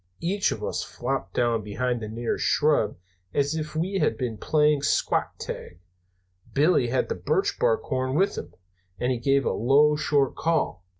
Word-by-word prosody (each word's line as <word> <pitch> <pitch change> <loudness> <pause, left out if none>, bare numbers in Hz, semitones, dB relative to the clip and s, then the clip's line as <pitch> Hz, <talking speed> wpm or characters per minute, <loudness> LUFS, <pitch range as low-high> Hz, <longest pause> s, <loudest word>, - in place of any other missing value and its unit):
"Each 195 +4 0
of - - -5
us - - -2
flopped 125 -7 -4
down 120 -2 +1
behind 120 +4 -2
the 110 - -4
nearest 115 +1 -2
shrub 145 -10 +2 0.4
as 140 +1 +1
if 155 -1 -4
we 185 +5 -1
had - - +1
been 125 -4 -3
playing 150 +6 +2
squat - - 0
tag. 85 - -7 0.8
Billy 145 -3 +3
had 130 +2 0
the - - -1
birch 390 - -1
bark 475 -2 +2
horn 130 +1 -2
with 195 +5 +2
him, - - -7 0.4
and 125 +1 0
he 125 - -1
gave 135 +2 +2
a - - +1
low, 145 +6 +4
short 145 -3 +1
call. 160 - 0
140 Hz, 175 wpm, -25 LUFS, 120-155 Hz, 0.8 s, low